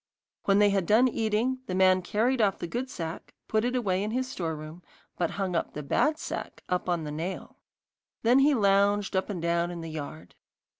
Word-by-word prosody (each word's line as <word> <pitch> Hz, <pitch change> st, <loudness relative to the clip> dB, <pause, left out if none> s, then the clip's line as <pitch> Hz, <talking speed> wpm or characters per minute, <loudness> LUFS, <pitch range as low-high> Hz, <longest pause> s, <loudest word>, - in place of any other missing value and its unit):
When 195 Hz, 0 st, +4 dB
they 205 Hz, 0 st, +5 dB
had 195 Hz, -3 st, 0 dB
done 230 Hz, +5 st, +5 dB
eating, 230 Hz, +2 st, 0 dB
the 185 Hz, -, -2 dB
man 185 Hz, 0 st, +4 dB
carried 235 Hz, +7 st, +1 dB
off 200 Hz, -3 st, +2 dB
the -, -, -5 dB
good 245 Hz, +9 st, -3 dB
sack, 165 Hz, -7 st, -6 dB
and -, -, -57 dB
put 220 Hz, 0 st, +1 dB
it 250 Hz, +1 st, 0 dB
away 195 Hz, -7 st, 0 dB
in 210 Hz, -, -2 dB
his 255 Hz, +3 st, -1 dB
store 165 Hz, -10 st, -3 dB
room, 155 Hz, +3 st, -9 dB, 0.3 s
but 170 Hz, -2 st, 0 dB
hung 195 Hz, -2 st, -1 dB
the 160 Hz, -3 st, -2 dB
bad 300 Hz, -, +1 dB
sack -, -, -6 dB
up 180 Hz, 0 st, -1 dB
on 170 Hz, -2 st, 0 dB
the 150 Hz, -, -5 dB
nail. 165 Hz, +5 st, -5 dB, 0.7 s
Then 245 Hz, +4 st, +5 dB
he 285 Hz, +1 st, +5 dB
lounged 200 Hz, -1 st, +2 dB
up 190 Hz, -, 0 dB
and 195 Hz, -4 st, -3 dB
down 170 Hz, 0 st, +1 dB
in 175 Hz, -1 st, -6 dB
the 165 Hz, -1 st, -6 dB
yard. 115 Hz, -, -7 dB
195 Hz, 210 wpm, -28 LUFS, 170-225 Hz, 0.7 s, they